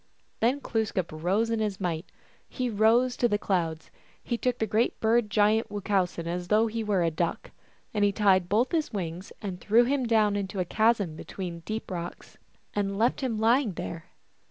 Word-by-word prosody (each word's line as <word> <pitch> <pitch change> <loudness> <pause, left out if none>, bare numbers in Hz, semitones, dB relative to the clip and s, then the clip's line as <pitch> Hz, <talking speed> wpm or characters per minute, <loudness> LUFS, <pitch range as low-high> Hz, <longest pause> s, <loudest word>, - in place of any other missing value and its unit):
Then 245 +5 +2
Glooskap 215 -8 -1
rose 190 +9 0
in 225 - 0
his 210 -3 -2
might; 175 -2 -3 0.4
he 250 -2 -2
rose 230 +4 +3
to 240 - +3
the 205 -3 +1
clouds; 165 -6 -2 0.3
he 240 - -1
took 250 +1 -1
the 220 - 0
Great 220 +3 0
Bird 225 0 +2
giant 215 +2 +2
Wuchowsen 195 -4 -1
as 175 +1 -3
though 215 +3 +4
he 225 0 -2
were 200 -4 +1
a 165 - +1
duck, 165 +2 -2 0.4
and 205 -2 +2
tied 190 -4 +3
both 230 +5 +2
his 320 -3 0
wings, 180 -2 -5
and 185 -3 -5
threw 225 +3 +5
him 260 0 0
down 215 -3 +3
into 200 -1 -3
a 180 - +1
chasm 215 -4 +2
between 175 +1 -6
deep 215 -1 -4
rocks, 175 -1 -7 0.3
and 200 -1 -1
left 235 +6 +1
him 250 -5 -1
lying 230 0 +3
there. 170 -1 -6
210 Hz, 180 wpm, -27 LUFS, 180-225 Hz, 0.4 s, threw